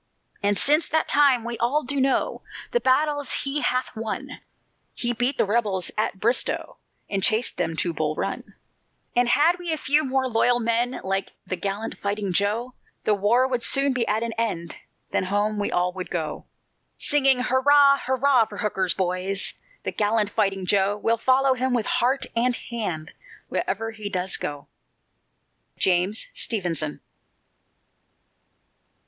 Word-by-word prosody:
And 205 -1 +1
since 300 - +4
that 315 0 0
time 275 -5 +4
we 235 0 -5
all 280 +6 +1
do 275 +1 -1
know 270 0 0 0.3
The 485 - +2
battles 290 - +1
he 280 +2 -2
hath 255 0 -1
won; 225 0 -5 0.6
He 240 0 -1
beat 245 +4 0
the - - +3
rebels 205 -4 0
at 215 -2 -1
Bristow, 235 +5 +1 0.3
And 195 -1 -1
chased 220 +5 +1
them 165 -2 -1
to 170 0 0
Bull 155 -1 -1
Run; - - -4 0.6
And 245 0 +3
had 320 +8 +4
we 350 -2 -4
a 315 - 0
few 295 +2 +1
more 265 0 0
loyal 245 +1 +3
men 235 +2 0
Like 195 +1 -2
the 185 - -3
gallant 200 +5 -4
fighting 200 -2 -2
"Joe," 215 +7 0 0.3
The 215 - +2
war 220 +6 +3
would 250 -2 -1
soon 275 +3 +3
be 245 -2 -1
at 215 +2 0
an 230 -1 -3
end, 170 -7 -2 0.3
Then - - 0
home 205 +2 0
we 205 - -1
all 180 0 0
would 185 -1 -6
go. 155 -3 -4 0.5
Singing, 270 -3 +3
hurrah, 280 +2 +5
hurrah, 260 -2 +3
for 205 - -10
Hooker's 190 -4 -1
boys, 185 +1 -2 0.3
The - - -2
gallant 210 0 0
Fighting 195 -2 0
Joe, 200 +1 +2
We'll 230 +2 +1
follow 260 +2 +3
him 255 0 0
with 230 -3 0
heart 260 +3 +1
and 245 +1 +2
hand, 180 -12 -5 0.4
Wherever 225 +4 -2
he 215 -2 -6
does 185 -1 -1
go. 145 -1 -5 1.1
JAMES 185 - +2
STEVENSON. 170 -8 -1
225 Hz, 155 wpm, -24 LUFS, 195-260 Hz, 1.1 s, hurrah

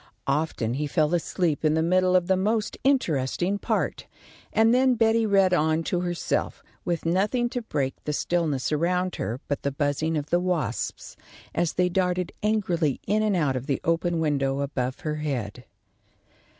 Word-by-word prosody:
Often 140 -5 -1
he 150 +3 -2
fell 155 +2 +1
asleep 170 -2 0
in 155 0 +3
the 160 - +2
middle 185 +2 +3
of 180 -1 +4
the 190 +1 +2
most 210 +3 0
interesting 180 - +1
part, - - -2 0.4
and 225 +1 +4
then 255 0 +4
Betty 225 0 +3
read 195 -2 +4
on 160 0 +2
to 175 - -1
herself, 175 -1 -2 0.2
with 170 -2 -2
nothing 210 +8 +1
to 245 - -3
break 140 - -2
the 150 - -1
stillness 155 -3 -1
around 180 +4 0
her 115 +4 -3
but 145 - -2
the 140 - -1
buzzing 145 +3 -1
of 145 0 -5
the 175 - +4
wasps, 170 - -2 0.4
as 175 - 0
they 180 0 +2
darted 180 0 0
angrily 180 - 0
in 210 +2 +1
and 215 -2 +1
out 150 -6 +1
of 130 +2 -4
the 140 -3 0
open 165 0 0
window 140 -3 0
above 130 0 -3
her 155 -3 -2
head. 125 -6 -4
170 Hz, 170 wpm, -25 LUFS, 145-185 Hz, 0.4 s, of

